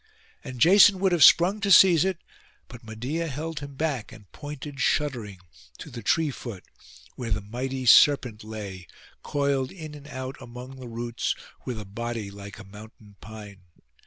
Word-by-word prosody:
And 130 -4 -8
Jason 195 - +7
would 190 0 +1
have 175 -3 +4
sprung 185 +5 +6
to 200 - 0
seize 185 -4 +7
it; 190 -2 -1 0.5
but 120 0 -12
Medeia 125 +10 -4
held 155 +2 -5
him 140 -1 -9
back, 140 -6 -3
and 100 -3 -15
pointed, 145 -1 -8
shuddering, 125 -10 -1 0.4
to - - -10
the 115 - -7
tree 155 +8 +1
foot, 115 -7 -8 0.5
where 120 -3 -6
the 105 - 0
mighty 125 +5 -5
serpent 125 -4 +5
lay, 100 -5 -8 0.3
coiled 140 -2 -1
in 155 -5 -9
and 145 -1 -12
out 130 -1 -6
among 125 +2 -10
the 125 -2 -9
roots, 115 0 -3 0.3
with 120 -3 -4
a 105 - -8
body 115 0 -5
like 100 0 -10
a 105 - -10
mountain 105 +1 -14
pine. 105 -3 -11
125 Hz, 165 wpm, -26 LUFS, 110-150 Hz, 0.5 s, Jason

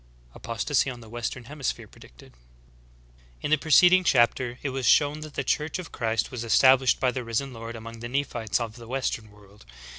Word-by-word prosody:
APOSTASY 120 +5 -1
ON 125 -2 -7
THE 115 - -13
WESTERN 120 +2 -5
HEMISPHERE 140 +1 -4
PREDICTED. - - -17
Z7. - - -26 1.1
In - - -2
the 155 - +5
preceding 180 +4 +5
chapter 120 -4 +2
it 140 - -2
was 130 -2 -2
shov/n 150 +1 +3
that 155 -2 -9
the - - -1
Church 150 +2 -1
of 180 -2 -8
Christ 115 -1 -1
was 125 -3 -5
established 130 +3 +4
by 125 - +2
the 125 0 -4
Risen 120 +4 -3
Lord 115 0 -8
among 115 0 -9
the 120 +1 -6
Nephites 125 -5 -1
of 115 -1 -5
the 115 -1 -12
western 120 -4 -3
world. 105 0 -19
125 Hz, 190 wpm, -26 LUFS, 115-140 Hz, 1.1 s, the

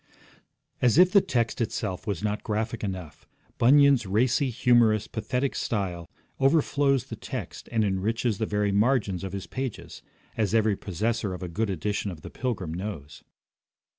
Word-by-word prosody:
As 125 +2 +3
if 180 +1 +7
the 200 - +6
text 120 -5 -1
itself 95 -4 -3
was 100 -3 -2
not 105 0 -1
graphic 110 +2 -2
enough, 90 -6 -6 0.3
Bunyan's 140 -2 +5
racy, 125 +7 +2
humorous, 120 -3 +3
pathetic 125 +4 -2
style 90 -6 -3 0.3
overflows 140 -2 +3
the 125 -3 -8
text - - -7
and 110 -2 +2
enriches 105 +3 -1
the 110 - -1
very 105 -1 0
margins 100 -3 +1
of 95 -1 -5
his 100 -1 -4
pages, 130 -3 -6 0.3
as 110 0 0
every 110 -2 +3
possessor 105 +1 -2
of 90 - -8
a - - -3
good 100 +6 -2
edition 100 +3 -2
of 85 -5 -8
The - - -9
Pilgrim 110 -10 -3
knows. 85 -6 -6
110 Hz, 155 wpm, -26 LUFS, 95-125 Hz, 0.3 s, if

